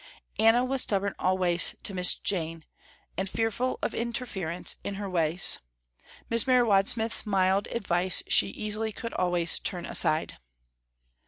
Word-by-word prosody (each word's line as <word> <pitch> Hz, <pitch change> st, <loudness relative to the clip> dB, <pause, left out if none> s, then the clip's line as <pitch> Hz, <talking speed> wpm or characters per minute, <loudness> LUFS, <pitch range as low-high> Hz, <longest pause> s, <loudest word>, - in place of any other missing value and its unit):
Anna 225 Hz, +3 st, +3 dB
was 265 Hz, 0 st, +1 dB
stubborn 200 Hz, -1 st, 0 dB
always 180 Hz, -2 st, +3 dB
to 200 Hz, -, 0 dB
Miss 180 Hz, -1 st, +5 dB
Jane, 165 Hz, -4 st, -5 dB, 0.5 s
and 190 Hz, 0 st, -4 dB
fearful 225 Hz, +4 st, -3 dB
of -, -, -2 dB
interference 220 Hz, -8 st, -4 dB
in 200 Hz, -, -6 dB
her 200 Hz, 0 st, -6 dB
ways. 175 Hz, -1 st, +2 dB, 0.7 s
Miss 230 Hz, +2 st, +1 dB
Mary 250 Hz, -2 st, +3 dB
Wadsmith's 220 Hz, +3 st, +1 dB
mild 195 Hz, 0 st, 0 dB
advice 185 Hz, -5 st, 0 dB
she 100 Hz, -, +4 dB
easily 215 Hz, -, -4 dB
could 230 Hz, +2 st, -8 dB
always 175 Hz, -2 st, +2 dB
turn 175 Hz, -3 st, -3 dB
aside. 155 Hz, +1 st, +1 dB
195 Hz, 135 wpm, -26 LUFS, 180-225 Hz, 0.7 s, Miss